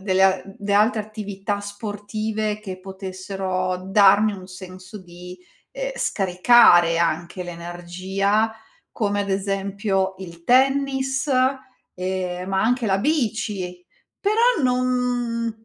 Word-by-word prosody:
delle 190 -1 +1
a 190 -1 +4
delle 200 0 -3
altre 215 +2 +3
attività 205 -1 -5
sportive, 210 +1 -4
che 190 -3 -8
potessero 190 -1 -4
darmi 200 +2 +5
un 185 -2 -9
senso 185 +1 -11
di, 180 0 -11 0.3
ehm, - - -4
scaricare 180 - +5
anche 170 +2 -1
l'energia, 180 +5 -2 0.4
come 205 -2 -1
ad 200 - -3
esempio 195 0 -1
il 170 -2 -10
tennis, 270 - +2 0.6
ehm, 185 0 -3
ma 190 0 +1
anche 240 +1 +1
la 195 - +2
bici, 210 - -2 0.3
però 455 - +2
non 245 -3 -1
200 Hz, 105 wpm, -22 LUFS, 185-225 Hz, 0.6 s, darmi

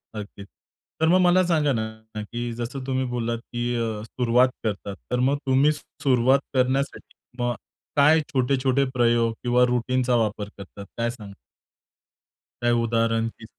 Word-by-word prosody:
नक्कीच. 100 -1 -8 0.5
तर 160 - +3
मग 185 +2 +5
मला 180 +1 +5
सांगा 155 -4 +2
ना, 110 -1 -5
की 120 +2 -5
जसं 120 +3 -5
तुम्ही 130 -1 -1
बोललात 120 -1 -2
की 120 0 -3
अ, 110 -2 -2
सुरुवात 125 +2 +2
करतात, 100 -2 -3 0.2
तर 125 - +1
मग 135 +3 +2
तुम्ही 135 +3 +4
सुरुवात 135 -3 +1
करण्यासाठी 130 +2 -1
किंवा 120 -1 -4 0.4
काय 150 +3 +5
छोटे-छोटे 130 +1 +2
प्रयोग 120 -2 +2
किंवा 125 0 +3
रुटीनचा 125 +1 +1
वापर 105 -2 -1
करतात, 100 0 -10
काय 115 0 0
सांगणार? 105 -4 -9 1.3
काही 120 0 +2
उदाहरण 115 0 +1
की 110 - -11
120 Hz, 140 wpm, -24 LUFS, 115-130 Hz, 1.3 s, मग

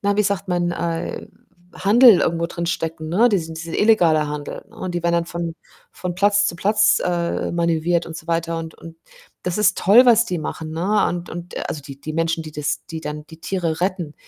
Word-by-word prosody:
na, 200 0 0
wie 210 - +4
sagt 200 -1 -2
man? 175 -1 0
Äh, 170 -1 -3 0.5
Handel 225 0 +6
irgendwo 170 0 0
drinstecken, 165 -2 -4
ne? 225 +8 +4
Diesen 165 -6 -1
diese 165 +1 -5
illegaler 170 -8 +4
Handel, 150 -1 -6
ne, 225 - -18
und 185 -2 -5
die 175 - -2
werden 170 - +1
dann 170 0 +1
von 170 -1 -4 0.4
von 180 -1 -5
Platz 205 +2 +3
zu 170 - -3
Platz, 205 +5 +3
äh, 175 -1 -1
manövriert 170 0 +1
und 165 -1 -7
so 160 - -11
weiter. 165 0 -1
Und 160 -1 -7
und 165 0 -12 0.5
das 180 +2 -2
ist 190 -3 +3
toll, 230 +7 +6
was 235 -1 +6
die 180 -7 -3
machen, 155 +1 -5
ne, 190 +6 +1
und 175 0 -4
und 175 +1 -8
also 150 - -5
die 140 0 -11
die 155 +1 -6
Menschen, 165 0 0
die 155 -1 -10
das 145 -1 -3
die 165 -2 -6
dann 150 0 -6
die 160 0 -14
Tiere 170 -3 -2
retten. 180 -5 -2
170 Hz, 210 wpm, -21 LUFS, 165-190 Hz, 0.5 s, Handel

